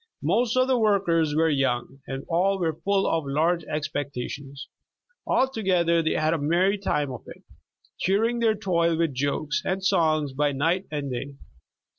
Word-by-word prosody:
Most 245 0 +1
of 255 0 +4
the 260 -2 +2
workers 175 -8 +2
were 160 +1 +3
young, 135 -2 -1
and 135 0 -5
all 185 +4 +1
were 165 -4 0
full 195 +5 0
of 165 -1 0
large 165 +5 +1
expectations. 140 -1 -5 0.6
Altogether 185 -10 +2
they 160 - 0
had 155 +1 +1
a 165 - -1
merry 180 +7 +1
time 150 -8 -1
of 125 - -7
it, - - -12 0.6
cheering 225 +6 +1
their 225 -2 +2
toil 170 -5 +1
with 165 -3 0
jokes 145 +3 -1
and 190 0 -2
songs 155 -5 +2
by 145 +1 0
night 165 +8 0
and 145 -3 -4
day. 135 +3 -5
165 Hz, 160 wpm, -25 LUFS, 145-195 Hz, 0.6 s, of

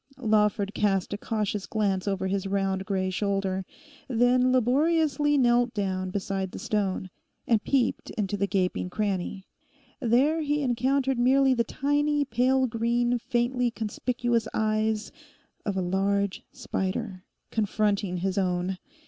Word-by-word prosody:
Lawford 210 -3 +1
cast 195 -3 0
a - - -2
cautious 210 -3 -2
glance 200 -3 0
over 195 -1 -1
his 195 +1 -1
round 195 0 -1
grey 190 -2 0
shoulder, 195 -1 -1 0.4
then 250 +1 +3
laboriously 295 +4 +2
knelt 240 -2 +3
down 185 -2 -1
beside 195 0 -2
the - - -6
stone, 190 -3 -2 0.3
and 225 -3 +2
peeped 265 -3 0
into 205 -2 -1
the 200 0 0
gaping 180 -2 -1
cranny. 195 -1 -2 0.5
There 275 +6 +2
he 295 -1 0
encountered 260 +1 +1
merely 265 +2 +4
the 235 -2 +2
tiny, 290 +4 0
pale 260 +1 +2
green, 240 +1 0
faintly 245 0 0
conspicuous 235 +1 -1
eyes 215 0 0 0.6
of 200 -2 -1
a - - +1
large 195 +2 0
spider, 190 0 -3 0.3
confronting 205 -3 0
his 190 +2 -1
own. 180 0 -1
215 Hz, 130 wpm, -27 LUFS, 195-250 Hz, 0.6 s, merely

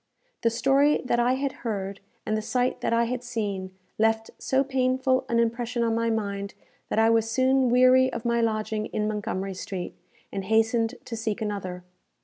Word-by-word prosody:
The 230 - +3
story 275 +5 +3
that 240 -1 +1
I 245 +1 +3
had 270 +1 -1
heard, 200 -4 -3 0.3
and 215 - 0
the 215 - -1
sight 250 +3 -1
that - - 0
I 230 0 +3
had 250 +1 -3
seen, 205 -6 -3 0.3
left 225 0 +1
so 265 +1 +1
painful 260 -1 +1
an 235 - +1
impression 235 +1 0
on 230 -1 +1
my 230 0 +1
mind, 200 -2 -3 0.3
that - - -2
I 225 +1 +5
was 225 0 +2
soon 260 +2 +3
weary 255 +1 +5
of 230 - -6
my 235 0 +2
lodging 215 -1 -1
in 210 0 -2
Montgomery 195 -2 -3
Street, 185 -1 -5 0.4
and 195 -1 -4
hastened 225 +2 +2
to 230 - -5
seek 220 -2 -2
another. 190 -4 -4
230 Hz, 180 wpm, -26 LUFS, 215-250 Hz, 0.4 s, I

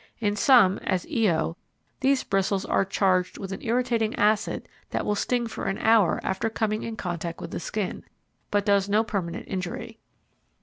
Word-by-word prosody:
In 205 -2 0
some, 210 -4 +5
as 185 -2 -1
Io, 170 -7 +1 0.4
these 270 0 +2
bristles 195 0 0
are - - +2
charged 185 -1 +1
with 195 -1 -6
an 195 - -5
irritating 235 -2 0
acid 215 +1 +1 0.2
that - - -2
will 210 - +1
sting 240 +3 0
for 230 - -5
an 195 0 -1
hour 220 -5 +4
after 190 +4 -1
coming 215 -1 -1
in 230 - -5
contact 170 -3 -4
with - - -7
the - - -3
skin, 195 +2 -3 0.5
but 205 -1 +1
does 200 -1 +3
no 210 +2 +3
permanent 185 -6 -3
injury. 190 +4 -5
205 Hz, 170 wpm, -26 LUFS, 190-225 Hz, 0.5 s, some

